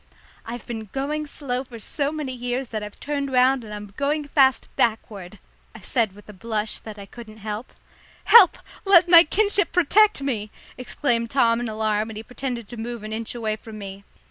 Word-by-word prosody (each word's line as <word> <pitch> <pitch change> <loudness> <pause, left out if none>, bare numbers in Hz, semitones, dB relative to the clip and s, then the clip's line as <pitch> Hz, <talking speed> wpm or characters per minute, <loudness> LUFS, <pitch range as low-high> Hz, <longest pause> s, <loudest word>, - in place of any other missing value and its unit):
"I've 240 +1 -7
been 225 -2 -6
going 295 +3 -2
so 290 - -10
slow 250 0 -1
for 245 -3 -11
so 280 +6 -2
many 300 -4 -4
years 245 +1 -3
that 215 -2 -4
I've 210 0 -9
turned 280 -2 -3
round 255 0 +3
and 215 - -10
I'm 205 -1 -8
going 290 +1 -1
fast 270 -3 +3
backward," 210 -4 -1 0.4
I 220 - -11
said 220 +1 0
with 205 - -16
a 210 - -11
blush 215 +1 -3
that 215 -1 -10
I 200 - -9
couldn't 220 0 -12
help. 215 +3 -6 0.5
"Help! 435 -7 +7 0.3
Let 370 -3 +6
my 340 -1 +9
kinship 405 +4 +1
protect 400 0 +3
me!" 220 -6 -2 0.3
exclaimed 240 -2 -1
Tom 230 -3 +3
in 240 -1 -3
alarm, 215 0 -1
and 220 - -8
he 220 - -6
pretended 245 -2 -5
to 240 - -9
move 235 0 -6
an 215 0 -6
inch 225 +2 -4
away 220 -2 -2
from 215 0 -11
me. 200 -1 -8
235 Hz, 195 wpm, -23 LUFS, 215-275 Hz, 0.5 s, my